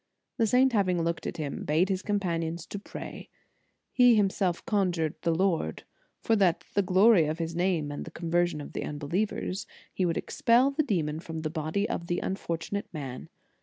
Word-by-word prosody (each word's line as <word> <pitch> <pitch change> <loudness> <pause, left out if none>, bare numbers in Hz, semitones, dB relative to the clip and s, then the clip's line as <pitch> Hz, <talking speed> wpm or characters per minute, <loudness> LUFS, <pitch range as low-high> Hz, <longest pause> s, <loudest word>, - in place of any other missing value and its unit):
The 225 -3 +3
saint, 255 +3 +4
having 185 -5 +2
looked 170 0 -2
at - - -5
him, 150 -3 -4
bade 160 +6 +2
his 190 -1 0
companions 170 -5 -2
to 205 - -6
pray. - - -8 0.6
He 245 -2 +6
himself 190 -4 +1
conjured 180 - +1
the - - 0
Lord, 165 - 0 0.4
that 185 -6 +3
for - - -30
the 200 - +3
glory 190 -2 +5
of 155 +1 -2
His 165 0 -3
name, 170 -4 0
and 145 - -5
the - - -8
conversion 170 -1 0
of - - -9
the - - -3
unbelievers, 180 +6 -2 0.3
He 185 - +1
would 165 - -1
expel 245 +4 +3
the 290 +3 +1
demon 165 - -1
from 160 -1 -6
the 155 -1 -3
body 160 +6 -1
of 170 - -4
the 175 - 0
unfor 190 -3 -2
tunate 200 +5 -4
man. 135 -6 -6
175 Hz, 185 wpm, -28 LUFS, 160-200 Hz, 0.6 s, He